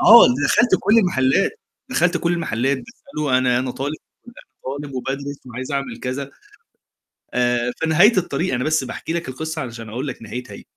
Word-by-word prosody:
آه، 235 +1 +10 0.2
دخلت 240 0 +3
كُلّ 225 +3 +4
المحلات 180 - +2 0.3
دخلت 175 -8 +2
كُلّ 170 0 0
المحلات 135 -5 0
باسأله 150 - -2
أنا 125 -1 +2
أنا 130 0 -2
طالب 140 +4 -3 0.3
أنا 240 - -13 0.3
طالب 140 +1 -5
وبادرس 135 +2 -4
وعايز 130 +3 -6
أعمل 140 -4 -3
كذا 135 +2 -4 1.0
آآ، 120 0 +1
في - - 0
نهاية 190 +8 +6
الطريق 175 -1 0
أنا 125 0 0
بس 155 -2 +1
باحكي 145 +5 -5
لك 170 -5 -3
القصّة 160 +4 -4
علشان 115 -3 -7
أقول 125 +6 -4
لك 130 - -6
نهايتها، 125 +3 -7
140 Hz, 165 wpm, -21 LUFS, 125-170 Hz, 1.0 s, آه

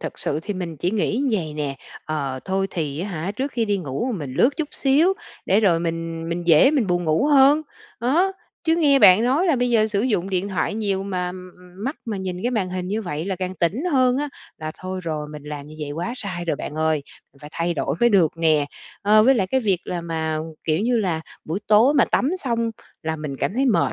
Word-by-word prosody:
thực - - -6
sự 150 - -2
thì 205 - -4
mình 175 -3 -5
chỉ 175 +5 -1
nghĩ 220 +4 0
vầy 170 -8 -1
nè, 145 -2 -3 0.3
ờ, 140 -4 -3
thôi 195 0 0
thì 150 -3 -3
á 190 - -3
hả, 175 0 -3
trước 265 +7 -3
khi 235 - 0
đi 205 -2 0
ngủ 175 - -3
mình 145 -10 -5
lướt 265 - +3
chút 310 -3 -2
xíu 295 +7 +3 0.3
để 200 +3 +4
rồi 170 -6 +3
mình 165 -1 -3
mình 170 0 -3
dễ 165 - +6
mình 275 -9 +1
buồn 175 -1 0
ngủ 155 - +2
hơn, 290 +1 +6 0.4
đó. 325 +11 +2 0.3
Chứ 325 0 +4
nghe 285 -5 +4
bạn 190 +2 +7
nói 280 +9 +2
là 320 -7 +3
bây 245 0 +1
giờ 220 -2 +4
sử 205 -2 -1
dụng 200 -6 0
điện 190 +2 -1
thoại 190 +2 -1
nhiều 200 -3 -1
mà 180 -2 -3 0.5
mắt 275 +4 -2
mà 220 -3 -3
nhìn 185 -2 -4
cái 245 - 0
màn 210 -7 0
hình 180 0 -4
như 215 +3 -1
vậy 160 -4 -4
là 190 -1 -2
càng 185 0 -4
tỉnh 190 - -1
hơn 255 -1 +4
á, 295 +2 -1 0.3
là 155 0 -5
thôi 185 0 -5
rồi, 155 -3 -3
mình 150 -1 -9
làm 150 -1 -7
như 155 - -11
vậy 145 - -4
quá 175 +10 -3
sai 185 -6 -5
rồi 160 -4 -1
bạn 150 - -6
ơi, 155 -1 +1 0.3
mình 140 - -23
phải 150 - -10
thay 170 0 -1
đổi 140 - -1
mới 240 - +6
được 185 -8 +4
nè. 155 -3 +3 0.4
Ờ, 210 +1 +6
với 265 +4 +5
lại 200 -6 +1
cái 260 +7 +1
việc 195 -6 +1
là 175 - -3
mà, 160 -2 -2 0.3
kiểu 155 -1 +1
như 240 +2 +1
là, 175 -6 0 0.2
buổi 165 +5 -2
tối 225 +7 +5
mà 275 - +5
tắm 275 - +1
xong 230 -2 0 0.3
là 160 0 -2
mình 150 -3 -5
cảm 190 - -2
thấy 265 +3 +2
mệt 240 - +2
190 Hz, 240 wpm, -22 LUFS, 160-235 Hz, 0.5 s, bạn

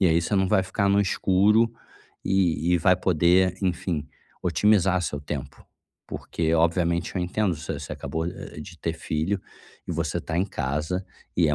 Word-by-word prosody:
E 95 - +5
aí 85 0 +4
você 100 +4 0
não 95 - +3
vai 95 -3 +3
ficar 100 +2 0
no 100 +1 +4
escuro 100 +3 +3 0.6
e 90 -3 +2
e - - +3
vai 90 +2 +5
poder, 90 +2 +3
enfim, 85 -4 -1 0.4
otimizar 95 -3 +3
seu 75 -3 -3
tempo, 70 -1 -6 0.4
porque 80 0 -2
obviamente 85 +2 +1
eu - - 0
entendo, 90 0 0
você 80 0 -5
você 70 - -7
acabou, 80 0 -3
eh, 75 - -8
de 85 +2 -10
ter 80 - -2
filho 80 +4 -2 0.5
e - - -1
você - - -1
tá 80 - -3
em 90 - +3
casa 80 +2 -2 0.3
e 85 -3 +4
é 75 - +2
90 Hz, 175 wpm, -25 LUFS, 80-95 Hz, 0.6 s, E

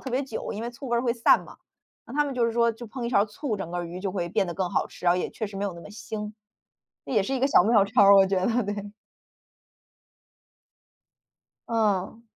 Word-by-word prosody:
特 265 - -7
别 260 +3 0
久， 260 -5 -5
因 215 - -5
为 240 - -4
醋 250 +2 -9
味 235 - +1
儿 235 - +1
会 240 -2 +1
散 235 -1 +4
嘛。 - - -14 0.5
那 235 - -11
他 295 0 +2
们 275 -2 -4
就 235 -2 +2
是 230 - -1
说 235 0 +2
就 235 +1 -10
烹 245 +2 -6
一 235 - -2
勺 200 -3 +4
醋， 215 +2 -4
整 170 -3 -6
个 175 0 -3
鱼 175 +2 -7
就 195 0 -2
会 175 -3 -3
变 190 - +1
得 175 - -5
更 185 -1 -2
好 - - 0
吃， - - -14
然 175 - +5
后 180 - 0
也 - - -2
确 220 - -4
实 200 -1 -9
没 200 - -2
有 195 -3 -3
那 170 - -10
么 - - -11
腥。 210 0 -6 0.7
这 - - -6
也 210 -4 +3
是 270 +7 -2
一 260 - -2
个 270 - +4
小 175 - +5
妙 215 -2 +4
招 215 +2 +3
儿， 200 0 +8
我 195 - +7
觉 190 0 0
得， 240 +1 +1
对。 205 0 -5 2.8
嗯。 220 -1 0
215 Hz, 270 characters per minute, -26 LUFS, 195-235 Hz, 2.8 s, 儿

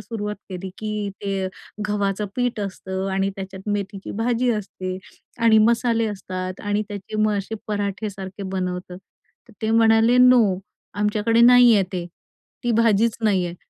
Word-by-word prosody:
सुरुवात 210 -2 -5
केली 185 0 -6
की 210 -1 -3
ते 195 -1 -1 0.4
गव्हाचं 205 0 -1
पीठ 245 -3 -1
असतं 190 -1 -4
आणि 195 +1 0
त्याच्यात 190 +1 -7
मेथीची 200 -1 -4
भाजी 245 +1 +1
असते 185 -3 -4 0.4
आणि 230 -1 +5
मसाले 230 -1 +2
असतात 185 -2 -5
आणि 205 0 -1
त्याचे 205 +1 -6
मग 215 -1 +2
असे 200 +3 -5
पराठे 205 0 -2
सारखे 195 0 -8
बनवतात. 180 -1 -4 0.5
तर - - -16
ते 220 - 0
म्हणाले 225 +1 +4
नो 250 -2 +7 0.5
आमच्याकडे 210 +2 +2
नाहीये 240 -3 +7
ते 175 -2 -3 0.6
ती 240 - +1
भाजीच 225 0 +3
नाहीये 185 -5 +1
205 Hz, 140 wpm, -22 LUFS, 190-225 Hz, 0.6 s, नो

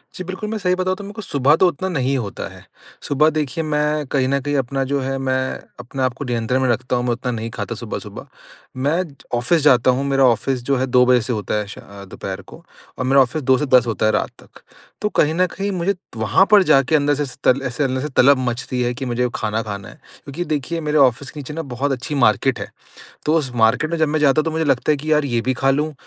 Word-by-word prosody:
जी 185 - -5
बिल्कुल, 190 +4 -5
मैं 220 - -2
सही 180 -3 +1
बताऊँ 185 0 -1
तो 205 - -8
मेरे 205 - -8
को 220 - -7
सुबह 145 -5 +2
तो 185 - +4
उतना 180 +3 -2
नहीं 135 -5 0
होता 105 -6 -5
है। - - -15 0.4
सुबह 150 +2 +3
देखिए 155 0 -2
मैं 150 0 0
कहीं 135 -2 +1
न 140 +1 +1
कहीं 145 +2 -2
अपना 135 +1 -1
जो 140 +1 -1
है 135 +1 -2
मैं 135 -1 -1 0.5
अपने 125 +2 -6
आप 130 - +1
को 140 +3 -7
नियंत्रण 120 +1 -1
में 130 - +2
रखता 125 +2 0
हूँ, 125 - 0
मैं 125 - +1
उतना 125 +1 -2
नहीं 115 0 -4
खाता - - -5
सुबह-सुबह। - - -7 0.5
मैं 150 +8 +1
ज 145 - -16 0.2
ऑफिस 120 +8 +2
जाता 130 -3 +5
हूँ, 130 +2 -1
मेरा 135 -1 +2
ऑफिस 125 +2 +1
जो 140 +2 +1
है 130 - 0
2 125 0 +4
बजे 125 -1 +4
से 125 +2 -3
होता 105 -2 -3
है 105 -1 -2
शा 100 - -10
अ, 100 0 -12
दोपहर 95 - -7
को - - -15 0.3
और 130 - -2
मेरा 135 +1 +5
ऑफिस 130 +5 0
2 130 0 +4
से 150 - -1
10 125 -3 +4
होता 110 -1 -1
है 110 - +4
रात - - 0
तक। - - -19 0.4
तो 210 - 0
कहीं 155 -5 +2
न 180 +2 +3
कहीं 200 +3 -4
मुझे 185 +2 0 0.2
वहाँ 110 - +3
पर 205 -2 +7
जाके 135 -2 +3
अंदर 145 -1 +2
से 145 - -1
ऐसे 130 -3 -7
तल 130 +2 +3
ऐसे 125 +3 -2
अंदर 130 -1 -1
से 150 - -3
तलब 140 +1 +6
मचती 125 +1 -2
है 120 0 0
कि 135 +2 -5
मुझे 125 0 0
खाना 110 +1 -1
खाना 100 -3 -6
है। - - -14 0.3
क्योंकि 145 +5 -5
देखिए 155 +2 -2
मेरे 150 0 0
ऑफिस 135 -1 +3
के 150 - -9
नीचे 145 +1 -7
ना 165 - -3
बहुत 140 -1 -3
अच्छी 135 +3 -3
मार्केट 125 0 +2
है। - - -5 0.6
तो 155 - +3
उस 150 -6 0
मार्केट 120 +7 +2
में 170 - -1
जब 155 -1 +2
मैं 155 +1 0
जाता 150 +1 +4
हूँ - - -2
तो 160 - -1
मुझे 160 0 -1
लगता 140 0 +1
है 150 - +1
कि 155 +2 -3
यार 150 -1 +3
ये 120 -4 0
भी 130 +3 -1
खा 135 +2 +1
लूँ, 150 +3 0
135 Hz, 265 wpm, -20 LUFS, 125-155 Hz, 0.6 s, पर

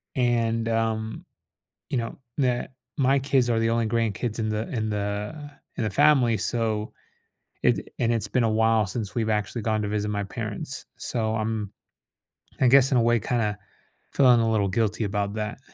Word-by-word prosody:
And, 115 -2 +1
um, 110 -1 -1 0.7
you - - 0
know, 115 -1 -3 0.2
that 125 -2 0 0.2
my 135 0 +3
kids 130 -2 +2
are 115 -1 +2
the 115 0 +2
only 115 -1 +1
grandkids 115 0 -1
in 110 - 0
the 110 +1 -2
in 110 -4 -2
the 105 +2 -2
uh, - - -9 0.3
in - - -1
the 110 - 0
family, 120 +1 +4
so, 110 -3 -1 0.7
it - - +4
d - - -5 0.2
and 120 -1 +2
it's 115 -3 -1
been 125 - +1
a 115 - +2
while 110 0 +3
since 100 +1 -5
we've 110 -2 0
actually 105 +2 -1
gone 110 0 0
to 105 - -2
visit 105 0 -1
my 105 -1 -1
parents. 95 - -5
So, 110 -2 -1
I'm, 110 -2 -2 0.9
I 130 - +5
guess, 135 +1 +6
in - - +4
a - - +4
way, 120 0 +3
kinda 105 -2 -1 0.6
feeling 125 -3 +6
a 115 - +1
little 105 -3 +1
guilty 110 +2 0
about 100 0 -1
that. 105 +2 -4
115 Hz, 185 wpm, -25 LUFS, 105-120 Hz, 0.9 s, guess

